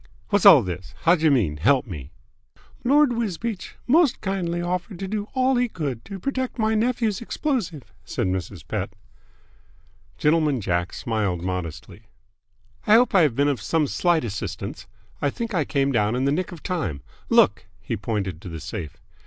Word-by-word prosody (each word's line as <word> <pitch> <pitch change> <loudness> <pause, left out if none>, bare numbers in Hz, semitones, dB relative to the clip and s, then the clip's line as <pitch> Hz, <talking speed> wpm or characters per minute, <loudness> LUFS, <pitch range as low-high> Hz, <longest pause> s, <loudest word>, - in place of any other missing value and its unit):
"Whassall 200 - +8
this? 90 0 -6
Howjer 165 -2 +4
mean 100 - +2
help 130 - +3
me?" 75 - -8 0.7
"Lord 280 +1 +4
Wisbeach 225 -2 -3
most 300 0 +4
kindly 180 -3 -2
offered 180 +2 -3
to 195 - -4
do 210 +1 -3
all 260 0 +3
he 245 0 +1
could 140 - -4
to 195 -1 -7
protect 260 +2 -3
my 220 -1 +1
nephew's 225 -2 0
explosive," 230 - -2 0.2
said - - -2
Mrs. 90 -2 -4
Pett. 100 0 -3 1.2
Gentleman 150 -3 +2
Jack 90 -3 -1
smiled 100 -7 -2
modestly. 90 +3 -5 0.8
"I 210 - +7
hope 245 +1 +4
I 190 - +6
have 145 -8 +3
been 140 +2 +3
of 140 -7 0
some 160 +6 +1
slight 170 +2 +1
assistance! 105 -4 -5 0.3
I 145 - +2
think 230 +9 -5
I 165 -6 +1
came 140 -1 +1
down 105 -2 +1
in 130 +2 0
the 140 - +2
nick 180 +5 -1
of 170 -4 -10
time. 120 - -3 0.3
Look!" - - +4
He - - -3
pointed 95 -7 -3
to 95 - -8
the 80 -1 -6
safe. 80 -1 -6
150 Hz, 165 wpm, -24 LUFS, -, 1.2 s, Whassall